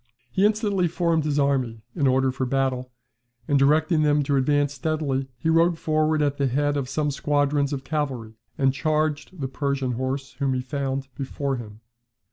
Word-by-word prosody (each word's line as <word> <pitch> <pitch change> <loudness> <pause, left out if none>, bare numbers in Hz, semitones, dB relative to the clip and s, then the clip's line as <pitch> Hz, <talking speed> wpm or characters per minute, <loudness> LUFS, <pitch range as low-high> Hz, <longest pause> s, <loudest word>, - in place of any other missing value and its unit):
He 195 - +4
instantly 205 -4 +1
formed 165 -2 +1
his 150 -1 0
army 130 -6 0
in 145 -5 +2
order 130 0 +3
for 130 0 -2
battle, 130 -1 -1 0.6
and 140 -1 +3
directing 155 +3 +3
them 150 -1 +3
to 140 0 0
advance 145 +1 +2
steadily, 140 -2 -1
he 125 - -3
rode 165 +1 +4
forward 155 -1 +1
at 145 -1 0
the 140 - +1
head 145 +3 +1
of 135 -3 -2
some 145 +1 0
squadrons 145 0 +1
of 135 -2 -3
cavalry, 135 -7 -3 0.2
and 135 -1 +3
charged 155 +3 -1
the 135 - -1
Persian 140 -1 -1
horse 130 +3 -3
whom 135 -2 +1
he 125 - -1
found 135 0 -3
before 135 0 -3
him. 110 -2 -10
140 Hz, 175 wpm, -24 LUFS, 135-155 Hz, 0.6 s, He